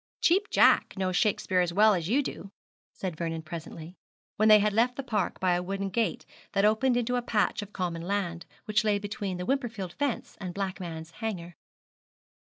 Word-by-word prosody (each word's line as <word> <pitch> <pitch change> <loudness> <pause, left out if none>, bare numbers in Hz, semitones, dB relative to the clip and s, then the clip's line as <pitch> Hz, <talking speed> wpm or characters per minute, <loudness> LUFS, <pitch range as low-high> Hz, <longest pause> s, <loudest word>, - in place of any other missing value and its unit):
'Cheap 390 +5 +3
Jack - - +4
knows 185 -1 -1
Shakespeare 195 -2 +1
as 175 -1 -1
well 210 +3 +6
as 175 -2 -2
you 275 +6 +3
do,' 195 - -6 0.4
said 185 -4 -5
Vernon 165 0 -3
presently, 165 +1 -8 0.4
when 215 +1 +3
they 215 - +10
had 210 0 +1
left 240 +3 +2
the 275 - -4
park 210 -7 -1
by 185 -1 +2
a 175 - +1
wooden 195 +2 -3
gate 225 +2 -1 0.3
that 195 - +3
opened 240 +4 +3
into 245 +1 0
a - - 0
patch 220 -3 0
of 205 0 -9
common 175 -4 -3
land, 175 -2 -2 0.2
which 215 0 +2
lay 210 -2 +2
between 205 -2 -4
the 180 - -4
Wimperfield 230 -8 -2
fence 285 -4 -3
and 180 -2 -5
Blackman's 175 -4 -5
Hanger. 175 -3 -5
200 Hz, 185 wpm, -28 LUFS, 175-220 Hz, 0.4 s, they